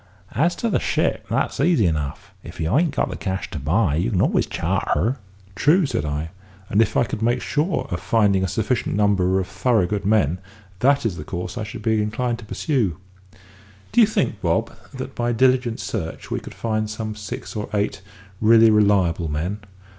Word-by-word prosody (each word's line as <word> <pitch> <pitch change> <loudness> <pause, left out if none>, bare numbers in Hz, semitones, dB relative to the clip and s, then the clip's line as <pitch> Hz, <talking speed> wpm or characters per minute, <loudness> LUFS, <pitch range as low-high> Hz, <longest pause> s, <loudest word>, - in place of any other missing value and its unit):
As 165 +9 +2
to 235 - -2
the - - +2
ship, - - -1
that's - - -1
easy 145 - +3
enough. 75 -4 -2
If - - -11
you 80 +6 0
ain't 160 -1 +2
got - - 0
the - - -4
cash 95 -2 -4
to - - -4
buy, 80 - +1
you 90 +8 0
can 100 -6 0
always - - +1
charter." 125 +5 0 0.4
"True," 160 - +3
said 120 - -2
I, 75 +2 -3 0.4
"and 105 - +4
if 115 - +1
I - - +4
could 105 -1 -4
make 120 +2 +2
sure 150 0 -1
of 85 - -2
finding 100 +1 +2
a - - +1
sufficient 110 +5 -1
number 95 -2 +2
of 95 - -1
thorough 115 -2 +1
good 100 +2 -2
men, 95 -5 +2 0.4
that 140 0 +3
is 95 -7 -1
the 75 - -6
course 90 +2 -5
I 115 - -3
should 110 - -8
be 110 -2 +2
inclined 115 +3 -1
to 115 - -10
pursue. 110 - -1 0.9
Do 240 - +5
you 220 - +7
think, 120 - -1
Bob, 85 -2 0 0.2
that - - -7
by 120 0 -1
diligent 125 -1 +2
search 85 -8 -5
we - - -1
could - - -11
find 110 -1 -1
some 110 0 -4
six 105 +1 -7
or 105 - -4
eight 100 -2 -1 0.4
really 110 0 +6
reliable 100 -6 +3
men? 85 +8 -2
105 Hz, 195 wpm, -22 LUFS, 95-120 Hz, 0.9 s, you